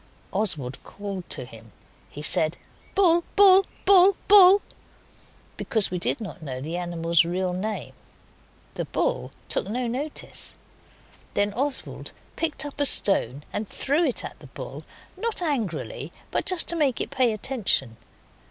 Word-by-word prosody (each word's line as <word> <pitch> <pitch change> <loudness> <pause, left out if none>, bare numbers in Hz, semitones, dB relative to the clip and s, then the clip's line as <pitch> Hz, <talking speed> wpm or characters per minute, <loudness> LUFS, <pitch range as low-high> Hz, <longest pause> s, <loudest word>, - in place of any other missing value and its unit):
Oswald 145 -12 0
called 200 -3 -7
to 130 - -5
him. 115 -2 -14 0.4
He 150 - -9
said, 155 +1 +3 0.4
'Bull! 345 -4 +4
Bull! 390 -1 +7 0.2
Bull! 385 0 +7
Bull!' 400 -1 +8 0.9
because 220 -5 +1
we 180 - -2
did - - 0
not 200 -4 -8
know 130 -4 -6
the 155 +6 -5
animal's 170 -1 +1
real 180 +2 -2
name. 210 +4 -4 0.8
The - - -4
bull - - -1 0.2
took - - -1
no 245 +4 -2
notice; 270 +6 -6 0.8
then 205 0 +1
Oswald 275 +4 -1 0.2
picked 300 -3 -1
up 290 0 -6
a - - +5
stone 145 - +3
and 210 0 -3
threw 290 +5 0
it 270 -7 -1
at - - -9
the - - -13
bull, - - -8 0.3
not 460 -1 -2
angrily, 280 - -3 0.2
but - - -1
just 370 -4 +1
to 340 - +1
make 285 -6 +1
it - - -4
pay 260 -4 +2
attention. 210 - -2
220 Hz, 145 wpm, -25 LUFS, -, 0.9 s, Bull